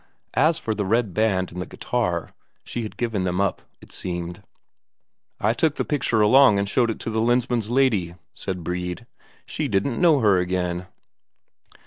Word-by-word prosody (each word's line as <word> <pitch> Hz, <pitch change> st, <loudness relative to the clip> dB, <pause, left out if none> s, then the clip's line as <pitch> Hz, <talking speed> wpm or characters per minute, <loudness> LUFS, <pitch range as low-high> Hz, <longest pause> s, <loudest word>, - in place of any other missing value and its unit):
As 160 Hz, +1 st, +3 dB
for 110 Hz, -, -2 dB
the 105 Hz, -1 st, -2 dB
red 110 Hz, 0 st, +1 dB
band 95 Hz, -4 st, +1 dB
and 90 Hz, +1 st, -5 dB
the -, -, -5 dB
guitar, 90 Hz, -9 st, -2 dB, 0.3 s
she 120 Hz, -, -5 dB
had 110 Hz, -, -7 dB
given 115 Hz, -5 st, -1 dB
them 90 Hz, 0 st, -1 dB
up, 100 Hz, -1 st, 0 dB, 0.2 s
it -, -, -15 dB
seemed. 85 Hz, 0 st, -5 dB, 1.0 s
"I 110 Hz, +2 st, +2 dB
took 150 Hz, +5 st, +1 dB
the -, -, -2 dB
picture 130 Hz, -7 st, +1 dB
along 125 Hz, 0 st, +6 dB
and 100 Hz, 0 st, 0 dB
showed 120 Hz, +3 st, +2 dB
it 110 Hz, -, -2 dB
to 115 Hz, -, -3 dB
the 110 Hz, 0 st, 0 dB
Lensmand's 120 Hz, -1 st, +1 dB
lady," 115 Hz, -10 st, +2 dB, 0.2 s
said 90 Hz, -2 st, -5 dB
Brede. 90 Hz, +5 st, -4 dB, 0.4 s
"She -, -, -3 dB
didn't 115 Hz, -, 0 dB
know 165 Hz, -5 st, +5 dB
her 100 Hz, -4 st, +4 dB
again." 90 Hz, 0 st, -2 dB
105 Hz, 170 wpm, -23 LUFS, 90-120 Hz, 1.0 s, along